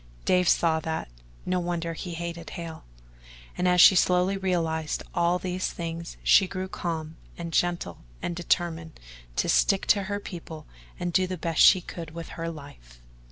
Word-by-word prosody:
Dave 180 -1 +3
saw 160 -2 +3
that 160 - -4 0.4
no 180 0 0
wonder 170 -1 -2
he 170 +1 -6
hated 170 0 -6
Hale. 165 -3 -8 0.7
And 180 - 0
as 180 0 +3
she 185 - +10
slowly 180 +1 +3
realized 165 -5 -1
all 175 +1 +2
these 185 0 -3
things, 170 0 -6
she 190 - +6
grew 185 0 -4
calm 160 -3 -4 0.2
and 170 -1 -6
gentle 175 - 0 0.2
and 175 - -3
determined 170 -2 -1 0.4
to - - 0
stick 195 - +3
to 200 -2 -3
her 205 +1 -2
people 165 -5 -9 0.3
and 175 -1 -2
do 185 +1 +3
the 185 0 -4
best 165 -1 0
she 185 - +8
could 165 -2 -8
with 170 0 -7
her 165 0 -4
life. - - -12
170 Hz, 165 wpm, -27 LUFS, 165-180 Hz, 0.7 s, she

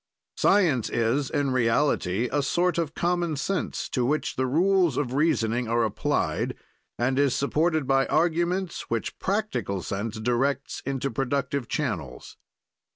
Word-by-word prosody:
Science 165 - +3
is, 120 +4 0
in 145 -3 0
reality, 115 -4 +1
a 145 +1 +1
sort 170 +5 +1
of 160 -2 -2
common 175 -2 0
sense 170 +2 -2
to 125 - -1
which 150 +5 0
the 130 0 0
rules 175 +1 +3
of 130 -4 -1
reasoning 125 -6 +1
are 115 +1 +2
applied, 110 - -1 0.4
and 130 +3 +1
is 140 -2 +3
supported 155 +2 +1
by 135 0 +2
arguments 175 +3 0
which 115 -1 -3
practical 195 - -2
sense 105 +3 -4
directs 130 +5 -1
into 135 0 -1
productive 135 +1 -1
channels. 105 - -4
140 Hz, 135 wpm, -26 LUFS, 120-165 Hz, 0.4 s, Science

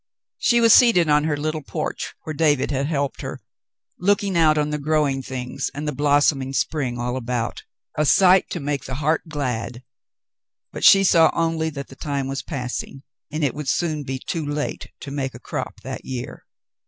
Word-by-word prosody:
She 240 -1 +3
was 230 -1 +7
seated 200 -10 +6
on 150 0 +4
her 150 -2 0
little 155 +1 -2
porch - - -4
where 155 - -5
David 145 -3 +2
had 140 0 0
helped 140 -3 -2
her, - - -6 0.6
looking 200 0 +1
out 155 -2 +4
on 150 0 0
the 150 - -2
growing 145 -2 +1
things 130 +1 -4
and 150 +1 -4
the - - 0
blossoming 145 -1 +2
spring 135 -4 -1
all 120 +1 -2
about 125 -2 -3 0.2
— - - -31
a - - +4
sight 185 +4 +5
to 175 - -4
make 140 -2 -3
the 130 - -5
heart 155 +3 +1
glad; 125 -5 -3 0.9
but - - -7
she 195 0 +8
saw 165 -4 +5
only 165 -1 0
that 140 -3 -7
the 135 - -12
time 140 -2 -3
was 135 +1 -3
passing, 135 -1 -5 0.3
and 155 +1 -2
it 140 - +1
would 150 -2 -4
soon 155 -2 0
be 135 -1 -4
too 160 +4 -4
late 145 0 -4
to 140 - -7
make 135 -2 -3
a - - -9
crop - - -6
that - - -6
year. 125 -2 -7
145 Hz, 190 wpm, -22 LUFS, 135-155 Hz, 0.9 s, she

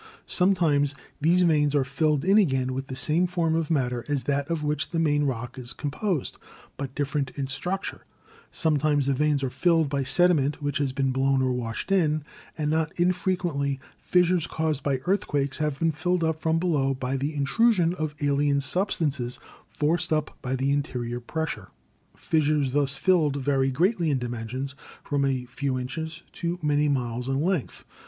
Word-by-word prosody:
Sometimes 160 -7 +2 0.3
these 175 +4 +4
veins 150 -4 +3
are 140 - +3
filled 150 +3 0
in 195 +3 +6
again 130 -8 +1
with 135 +1 -4
the 130 - -6
same 160 +7 +1
form 170 -3 0
of 160 -1 0
matter 125 -6 0
as 145 -3 0
that 140 -1 -1
of 165 -2 -1
which 150 0 -1
the 170 - -3
main 145 -3 +2
rock 125 -1 -3
is 125 +1 -3
composed, 155 - -2 0.4
but 135 -1 -6
different 140 -1 -1
in 140 - -1
structure; 175 +9 -4 0.5
sometimes 150 -2 +2
the 140 - +2
veins 145 0 +1
are 130 - -1
filled 165 -2 +2
by 140 0 0
sediment 150 -2 +2
which 145 -1 -2
has 140 -2 0
been 135 0 0
blown 135 +1 +2
or 130 - +1
washed 120 - -4
in, 155 -6 +2 0.3
and 150 -1 0
not 160 0 +1
infrequently 175 -6 0 0.2
fissures 180 -2 +2
caused 155 -3 -1
by 135 -1 0
earthquakes 145 -8 0
have 150 -2 -1
been 165 +1 +2
filled 170 +3 0
up 160 -1 0
from 160 0 +1
below 145 -6 +1
by 130 +1 -2
the 145 +3 -2
intru 225 +12 +3
sion 175 -5 +2
of 155 -4 -3
alien 145 0 +2
substances 140 -6 -1 0.3
forced 160 +3 0
up 155 -1 0
by 130 0 -2
the 135 +2 0
interior 125 -4 -2
pressure. 155 - -4 0.5
Fissures 150 -4 +1
thus 140 -1 +2
filled 165 -7 +2
vary 135 -1 +1
greatly 170 - +1
in 140 - +2
dimensions, 125 +2 -4 0.3
from 145 -1 0
a 130 -2 0
few 130 +1 -2
inches 160 +6 -5
to 170 0 -3
many 150 0 +2
miles 125 -2 -1
in 135 0 0
length. 170 -2 -1
145 Hz, 175 wpm, -26 LUFS, 135-165 Hz, 0.5 s, in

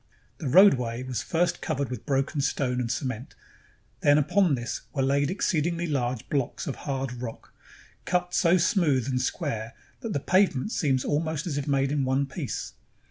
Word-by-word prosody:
The 155 - -3
roadway 125 - +5
was 130 -2 -3
first 170 +1 0
covered 140 -4 -2
with 125 +1 -6
broken 135 +1 0
stone 125 -2 0
and 120 - -3
cement; 130 -2 -4 0.6
then 145 0 +5
upon 175 +1 +3
this 120 -2 -4
were 135 - 0
laid 140 +1 +2
exceedingly 170 -2 0
large 130 -6 -2
blocks 140 -4 -2
of 140 - -3
hard 135 -3 -3
rock, 115 -3 -8 0.5
cut 180 0 0
so 175 +1 +4
smooth 155 - +2
and 125 -2 0
square 125 -5 -3 0.3
that 225 -3 -4
the - - 0
pavement 185 +1 +2
seems 135 - +1
almost 155 0 -1
as 145 -5 -2
if 145 - -5
made 135 -1 +1
in 145 -2 +1
one 130 +2 +1
piece. 135 +1 -5
140 Hz, 170 wpm, -27 LUFS, 130-165 Hz, 0.6 s, roadway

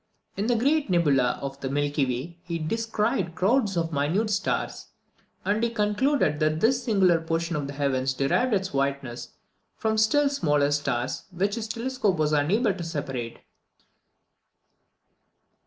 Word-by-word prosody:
In 205 +3 -1
the 240 - +3
great 280 +3 +1
nebula 145 -8 +2
of 135 0 -5
the 135 - -3
Milky 145 0 0
Way, 135 +8 -4
he 170 -2 -4
descried 205 -1 -1
crowds 205 0 +2
of 165 -1 -1
minute 170 +10 0
stars; 205 0 -2 0.6
and 210 +2 +1
he 235 - +2
concluded 210 - +1
that 155 0 +1
this 250 +5 +2
singular 185 -7 +3
portion 165 +1 -2
of 145 -2 -2
the 140 - -6
heavens 135 -2 0
derived 140 - +1
its 190 -3 -2
whiteness 135 -3 -2 0.4
from 220 0 0
still 285 +7 +4
smaller 150 - +1
stars, 130 -4 -1
which 195 +2 -1
his 225 0 -3
telescope 230 -3 -1
was 155 -1 +1
unable 195 - +2
to 175 - -6
separate. 135 -8 -5
170 Hz, 145 wpm, -26 LUFS, 145-220 Hz, 0.6 s, still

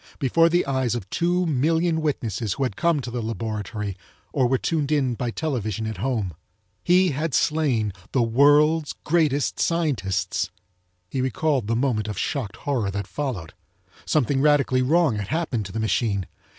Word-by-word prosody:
Before 165 +5 +3
the 175 +1 +2
eyes 130 -3 0
of 110 -5 -5
two 175 +2 +1
million 160 +3 +1
witnesses 115 -8 -1
who 140 - -2
had 125 -7 -2
come 170 +1 +1
to 120 - -6
the 120 0 -3
laboratory 105 -2 -4 0.4
or 130 - +3
were 130 +2 +2
tuned 155 0 -1
in 135 -5 +2
by 120 +1 -3
television 110 - -2
at 110 -2 -4
home! 110 -5 -1 0.5
He 180 +1 +4
had 150 0 -2
slain 130 -10 +1 0.2
the 125 - +2
world's 145 +6 +4
greatest 150 -4 +1
scientists! 100 - 0 0.6
He 130 +8 -2
recalled 130 -1 0
the 115 - +1
moment 115 -4 0
of 105 -3 -4
shocked 110 -3 -2
horror 125 -8 -1
that 100 0 -3
followed. 105 - -4 0.5
Something 135 -2 +1
radically 140 -3 +3
wrong 150 -2 +3
had 100 -2 -4
happened 130 - -1
to - - -10
the 110 - -3
machine. 110 -3 0
130 Hz, 165 wpm, -24 LUFS, 110-150 Hz, 0.6 s, He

